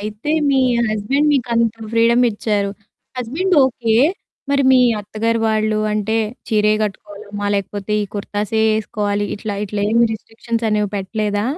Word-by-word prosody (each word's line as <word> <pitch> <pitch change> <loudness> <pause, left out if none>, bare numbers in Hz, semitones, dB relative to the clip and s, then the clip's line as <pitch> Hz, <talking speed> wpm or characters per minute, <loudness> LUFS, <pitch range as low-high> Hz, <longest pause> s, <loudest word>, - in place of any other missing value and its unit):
అయితే, 210 +7 -5 0.2
మీ 270 -1 +3 0.3
హస్బెండ్ 240 +8 +1
మీకు 250 -3 0
అంత 230 -1 +2 0.2
ఫ్రీడమ్ 235 +2 +4
ఇచ్చారు. 205 -1 -1 0.5
Husband 300 +11 -1
okay. 240 -3 0 0.6
మరి 280 0 +3
మీ 260 - +6 0.2
అత్తగారు 225 +2 -1
వాళ్ళు 215 0 +1
అంటే, 215 +1 0 0.3
చీరే 210 -1 +3
కట్టుకోవాలమ్మా 205 0 -5
లేకపోతే 200 +1 -3
ఈ - - -1
కుర్తాసే 205 +1 -2
ఏసుకోవాలి. 205 -1 -2
ఇట్లా, 205 -1 -4
ఇట్లా 205 +1 -3
ఏం 230 - +3 0.2
రిస్ట్రిక్షన్స్ 230 +1 -4
అనేవి 210 -1 0
పెట్టలేదా? 205 +1 -2
215 Hz, 135 wpm, -19 LUFS, 205-230 Hz, 0.6 s, మీ